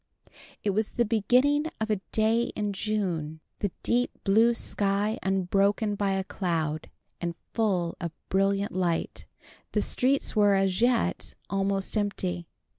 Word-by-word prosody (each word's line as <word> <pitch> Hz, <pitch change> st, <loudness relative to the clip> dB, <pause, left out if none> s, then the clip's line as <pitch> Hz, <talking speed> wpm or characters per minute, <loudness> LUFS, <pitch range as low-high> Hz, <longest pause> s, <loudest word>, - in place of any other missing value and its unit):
It 205 Hz, -, +2 dB
was 210 Hz, +2 st, -1 dB
the 240 Hz, -, +2 dB
beginning 250 Hz, +7 st, +3 dB
of 220 Hz, 0 st, -1 dB
a 205 Hz, -3 st, 0 dB
day 225 Hz, +2 st, +3 dB
in 210 Hz, -1 st, -1 dB
June, 180 Hz, -7 st, -2 dB, 0.2 s
the 205 Hz, -, 0 dB
deep 245 Hz, +1 st, +2 dB
blue 225 Hz, +4 st, +4 dB
sky 205 Hz, 0 st, 0 dB
unbroken 195 Hz, +3 st, +1 dB
by 200 Hz, -1 st, 0 dB
a 190 Hz, 0 st, 0 dB
cloud, 165 Hz, -5 st, -2 dB, 0.3 s
and 170 Hz, -1 st, -3 dB, 0.2 s
full 185 Hz, -7 st, 0 dB
of 170 Hz, -2 st, -3 dB, 0.2 s
brilliant 195 Hz, +1 st, +1 dB
light. 175 Hz, -2 st, -1 dB, 0.5 s
The -, -, +2 dB
streets 270 Hz, +1 st, +1 dB
were, 205 Hz, -2 st, +5 dB
as 195 Hz, 0 st, +1 dB
yet, 240 Hz, -1 st, +1 dB, 0.2 s
almost 195 Hz, 0 st, 0 dB
empty. 185 Hz, -4 st, -2 dB
200 Hz, 135 wpm, -27 LUFS, 185-220 Hz, 0.5 s, were